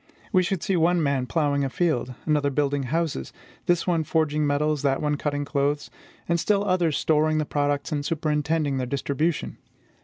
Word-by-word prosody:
We 185 - +5
should 185 -1 -2
see 195 - +1
one 170 0 +3
man 140 -3 0
plowing 140 +1 +1
a 135 - 0
field, 130 -3 -1
another 150 -2 +2
building 140 0 0
houses; 160 - -1 0.4
this 175 -1 +2
one 170 -3 +1
forging 155 -1 +1
metals, 150 +1 +1
that 135 -1 +1
one 150 -1 0
cutting 145 0 -2
clothes; 145 0 -1 0.4
and 170 0 +1
still 205 +3 +1
others 175 -5 +1
storing 155 0 +2
the 155 - 0
products, 145 -1 -1
and 145 -1 -1
superintending 150 -2 0
their 130 -1 -2
distribution. 140 +4 -2
150 Hz, 175 wpm, -25 LUFS, 140-165 Hz, 0.4 s, We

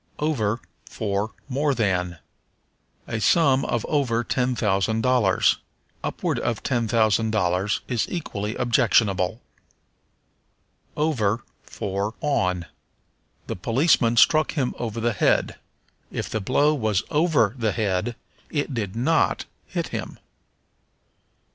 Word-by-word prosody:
Over 125 -8 0 0.2
for 105 -1 -3
More 140 +1 0
than. 90 -6 0 0.9
"A 115 - -3
sum 135 +2 +4
of 120 - -1
over 125 -6 +1
ten 125 +1 0
thousand 110 0 +1
dollars." 120 -7 +3 0.5
"Upward - - -2
of 115 -2 -2
ten 120 -3 0
thousand 110 0 +2
dollars" 95 -1 0
is 120 -3 0
equally 110 - -4
objectionable. 110 -4 +2 1.6
Over 120 -8 +1 0.2
for 100 +3 -4
On. 90 -12 0 0.8
"The - - -4
policeman 120 - +2
struck 155 +6 +5
him 135 -6 -1
over 115 -1 -3
the 115 0 +1
head." 100 - +1 0.5
If - - -4
the 110 - -1
blow 145 +8 +3
was 110 -8 0
over 150 - +3
the 110 -4 0
head 105 +2 -1 0.3
it 145 -2 -2
did 105 -5 -3
not 145 +7 +1 0.2
hit - - -3
him. - - -5
115 Hz, 115 wpm, -24 LUFS, 105-130 Hz, 1.6 s, struck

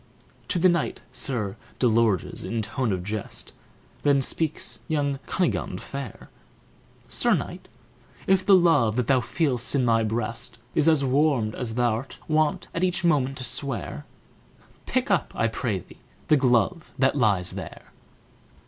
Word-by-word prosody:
To 185 - 0
the 180 +2 +5
knight, 170 -3 +1
Sir 120 -6 -3 0.2
Delorges, 115 -6 +2
in 115 -1 -2
tone 125 +1 -1
of 90 -2 -2
jest, 105 +2 -5 0.5
Then 145 -1 +4
speaks 155 +3 -2
young 145 -3 0
Cunigund 180 -3 -1
fair; 135 -5 -8 0.8
"Sir - - +2
Knight, - - -5 0.6
if 190 0 +3
the 195 0 +7
love 155 -12 +4
that 125 -1 +1
thou 130 0 +3
feel'st 130 0 -1
in 130 -3 +2
thy 115 -1 +3
breast 115 +1 -3 0.2
Is 155 0 +2
as 155 -4 +4
warm 135 -5 +2
as 115 -1 -4
thou'rt 120 +1 0
wont 155 -1 +1
at 170 - -1
each 180 0 +1
moment 135 -5 +2
to 130 - -5
swear, 120 - -3 0.8
Pick - - 0
up, - - +1
I - - +1
pray 115 -2 -2
thee, 90 - -12 0.3
the 155 - +7
glove 135 +5 +2
that 135 +1 +3
lies 100 -9 +2
there!" - - -9
130 Hz, 150 wpm, -25 LUFS, 115-155 Hz, 0.8 s, the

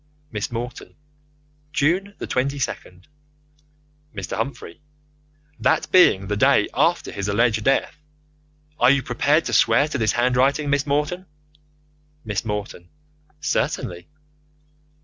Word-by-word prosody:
Miss 105 0 -4
Morton: 120 +1 -6 0.8
June 180 +7 0
the - - -5
22nd. 125 -9 -3 1.1
Mr. - - -5
Humphrey: 140 - -5 0.8
That 160 - +1
being 140 - +5
the 105 +1 -2
day 105 - +3
after - - +1
his 100 -1 -4
alleged 110 +1 +1
death. 135 +4 +1 0.8
Are 125 - +5
you 140 -1 +3
prepared 145 +6 +1
to 120 - -3
swear 115 +6 +4
to 140 - -3
this 110 -2 +1
handwriting, 130 +4 +1
Miss 140 0 +1
Morton? 150 +6 -1 1.0
Miss 100 -3 -2
Morton: 105 -5 -5 0.5
Certainly. 90 -1 -2
125 Hz, 110 wpm, -22 LUFS, 105-145 Hz, 1.1 s, being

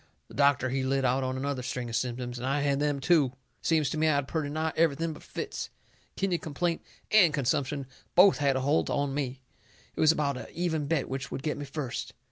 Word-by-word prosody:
The - - -13
doctor, 140 -2 +3
he 135 0 0
lit 135 0 +1
out 130 +1 +2
on 130 0 -2
another 140 -1 -2
string 125 0 -4
of 115 - -4
symptoms, 125 0 -2
and 125 - -3
I 140 +2 +1
had 140 -1 +1
them, 145 -1 0
too. 145 -3 +3 0.3
Seems 155 -3 +2
to 155 - -2
me 160 - +3
I 155 - +3
had 140 -1 0
purty 155 -3 -2
nigh 155 +2 -1
everything 165 0 +1
but 150 - -12
fits. - - -5 0.5
Kidney 185 -3 0
complaint 165 +3 -2 0.3
and 195 -7 +7
consumption 140 +1 0 0.3
both 185 0 +7
had 140 -2 +2
a 130 - 0
holt 145 +4 +2
on 140 -1 0
me. 135 -2 -3 0.5
It - - -9
was 155 - +6
about 145 -4 0
a - - -8
even 160 -4 -1
bet 155 -2 0
which 135 +1 -4
would 135 - -5
get 155 - -1
me 145 - -4
first. 140 -2 -5
140 Hz, 225 wpm, -29 LUFS, 130-155 Hz, 0.5 s, and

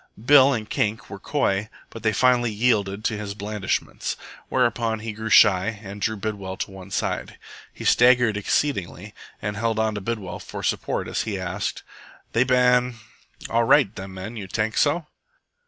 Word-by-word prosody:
Bill 140 0 +7
and 110 -5 -2
Kink 105 0 -2
were - - -7
coy, 100 +2 0 0.2
but 115 - -9
they 110 - +2
finally 120 +1 +3
yielded 105 -2 +1
to 110 -1 -1
his 100 -1 -5
blandishments. 105 -1 -3 0.3
Whereupon 120 -3 +1
he 110 -1 -5
grew 110 +1 -5
shy 100 +2 +5
and 100 0 -8
drew 110 +1 0
Bidwell 100 -2 -4
to - - -4
one 95 0 -11
side. 95 - -3 0.3
He - - -9
staggered 120 -3 +5
exceedingly, 105 - -1 0.3
and 105 0 -3
held 115 0 0
on 110 0 +1
to 105 - -4
Bidwell 100 -4 -4
for - - -8
support - - -1
as - - -1
he 105 -3 -3
asked 95 +3 -3 0.5
"They 115 - +4
ban 125 -1 +3 0.5
all 115 0 +2
right, 105 -2 +4
them 95 0 -8
men, 100 +5 -7
you 100 -3 -6
tank 110 +3 -1
so?" 155 +3 +2
110 Hz, 170 wpm, -24 LUFS, 100-120 Hz, 0.5 s, Bill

